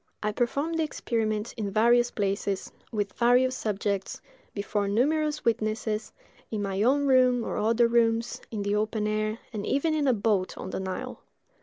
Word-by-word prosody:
I 210 - +1
performed 285 +9 -1
the - - +3
experiment 220 -7 -2
in 210 -3 -2
various 235 +4 +4
places, 200 -2 -2 0.2
with 205 -4 -2
various 250 +2 +3
subjects, 200 -3 -2 0.3
before 205 0 -2
numerous 300 +8 +1
witnesses, 215 -1 -1 0.4
in 210 -2 -2
my 195 0 -2
own 275 +5 +3
room 255 -3 +4
or - - -3
other 230 +2 +3
rooms, 230 0 +1
in 210 -3 -3
the 200 0 0
open 215 +1 0
air, 215 +1 -1 0.2
and 210 -2 -3
even 295 +7 +1
in 300 -2 +1
a 260 - +5
boat 205 -3 0
on - - -6
the - - -3
Nile. 190 -1 -5
220 Hz, 165 wpm, -27 LUFS, 205-245 Hz, 0.4 s, a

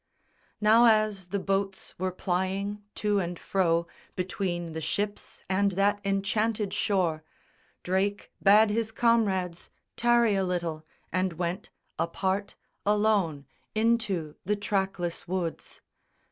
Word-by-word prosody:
Now 220 +3 +6
as 215 -4 +2
the 200 - -2
boats 195 0 -2
were 185 0 0
plying 190 +3 -2
to 210 -1 +1
and 175 -1 -3
fro 170 -3 +1 0.3
Between 180 -2 -2
the 160 0 -5
ships 205 +6 -3
and 195 +1 +2
that 200 +2 +2
enchanted 205 +1 0
shore, 180 -7 0 0.6
Drake 195 +3 -1
bade 210 +2 +6
his 220 0 -1
comrades 200 -7 +1 0.3
tarry 235 -2 +4
a 195 -1 +1
little 170 -4 -2 0.3
and 185 -1 +1
went 175 +4 -3 0.3
Apart, 190 +4 -1 0.3
alone, 205 -8 +2 0.3
into 215 -8 +1
the 210 +3 +1
trackless 195 -4 -2
woods. 175 -2 -4
195 Hz, 115 wpm, -28 LUFS, 180-210 Hz, 0.6 s, Now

